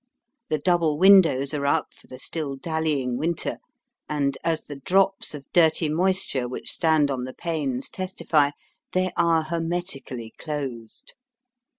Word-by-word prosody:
The 155 Hz, -, +1 dB
double 165 Hz, -1 st, +2 dB
windows 165 Hz, -7 st, +6 dB
are 140 Hz, -1 st, -1 dB
up 155 Hz, +2 st, +1 dB
for -, -, -19 dB
the 130 Hz, -, -10 dB
still 140 Hz, +1 st, -4 dB
dallying 145 Hz, -4 st, -1 dB
winter, 165 Hz, +2 st, -2 dB, 0.5 s
and, 140 Hz, -2 st, 0 dB
as 165 Hz, -1 st, 0 dB
the 145 Hz, -, -8 dB
drops 190 Hz, +4 st, +2 dB
of 140 Hz, -2 st, -9 dB
dirty 160 Hz, -2 st, +4 dB
moisture 175 Hz, -6 st, 0 dB
which 125 Hz, -, -5 dB
stand 155 Hz, -4 st, +2 dB
on 130 Hz, -2 st, -2 dB
the 130 Hz, +1 st, -7 dB
panes 145 Hz, -7 st, -2 dB
testify, 170 Hz, -6 st, 0 dB, 0.4 s
they 185 Hz, 0 st, +1 dB
are 165 Hz, -1 st, +3 dB
hermetically 165 Hz, -8 st, -4 dB
closed. 140 Hz, -, -6 dB
155 Hz, 135 wpm, -25 LUFS, 140-170 Hz, 0.5 s, windows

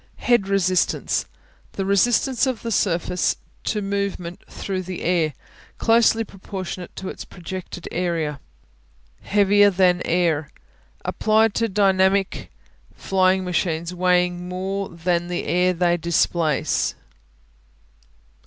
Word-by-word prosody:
Head 235 Hz, -6 st, +2 dB
Resistance 185 Hz, -2 st, +1 dB, 0.5 s
The 195 Hz, -, -3 dB
resistance 240 Hz, +6 st, +2 dB
of 255 Hz, -3 st, -3 dB
a 230 Hz, -, -2 dB
surface 180 Hz, -2 st, +1 dB, 0.3 s
to 210 Hz, -2 st, -1 dB
movement 195 Hz, -3 st, -3 dB
through 190 Hz, -2 st, -4 dB
the 185 Hz, -1 st, -6 dB
air; 165 Hz, -4 st, +1 dB, 0.4 s
closely 225 Hz, 0 st, +4 dB
proportionate 190 Hz, -3 st, -7 dB
to 190 Hz, -, -5 dB
its -, -, -7 dB
projected 180 Hz, -1 st, -8 dB
area. 165 Hz, -5 st, -1 dB, 0.8 s
Heavier 205 Hz, 0 st, +4 dB
than 180 Hz, -2 st, +3 dB
air 165 Hz, -4 st, +1 dB, 0.6 s
Applied 220 Hz, 0 st, +2 dB
to 230 Hz, 0 st, 0 dB
dynamic 195 Hz, -1 st, +2 dB, 0.5 s
flying 190 Hz, 0 st, +2 dB
machines 170 Hz, -1 st, -1 dB
weighing 180 Hz, 0 st, +1 dB
more 190 Hz, +2 st, -3 dB
than 175 Hz, 0 st, -1 dB
the 175 Hz, 0 st, -3 dB
air 180 Hz, +1 st, +2 dB
they 175 Hz, -1 st, +1 dB
displace. 165 Hz, -2 st, +1 dB
185 Hz, 105 wpm, -22 LUFS, 175-200 Hz, 0.8 s, closely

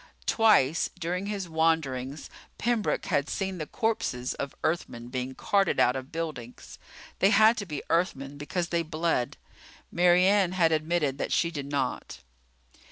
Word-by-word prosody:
Twice 205 Hz, -, +3 dB
during 180 Hz, +2 st, -3 dB
his 200 Hz, -3 st, -3 dB
wanderings 160 Hz, -4 st, -1 dB, 0.3 s
Pembroke 235 Hz, -2 st, 0 dB
had 140 Hz, +1 st, 0 dB
seen 190 Hz, -2 st, -3 dB
the 155 Hz, -, -4 dB
corpses 130 Hz, -, -1 dB
of 140 Hz, -, -5 dB
Earthmen 120 Hz, -7 st, -2 dB
being 130 Hz, +1 st, -4 dB
carted 200 Hz, +6 st, +1 dB
out 125 Hz, -, +4 dB
of 130 Hz, 0 st, -6 dB
buildings. 150 Hz, -8 st, -6 dB, 0.4 s
They 195 Hz, -, +5 dB
had 220 Hz, +1 st, +6 dB
to 200 Hz, -, -4 dB
be 150 Hz, -3 st, -5 dB
Earthmen 145 Hz, -5 st, -1 dB
because 170 Hz, +4 st, -3 dB
they 170 Hz, -1 st, +1 dB
bled. 160 Hz, -5 st, -1 dB, 0.5 s
Mary 175 Hz, +1 st, +4 dB
Ann 195 Hz, -2 st, +3 dB
had 170 Hz, -3 st, +3 dB
admitted 155 Hz, -3 st, 0 dB
that -, -, -2 dB
she 170 Hz, -, +1 dB
did 145 Hz, -4 st, -5 dB
not. 140 Hz, -2 st, -3 dB
165 Hz, 150 wpm, -27 LUFS, 140-185 Hz, 0.5 s, had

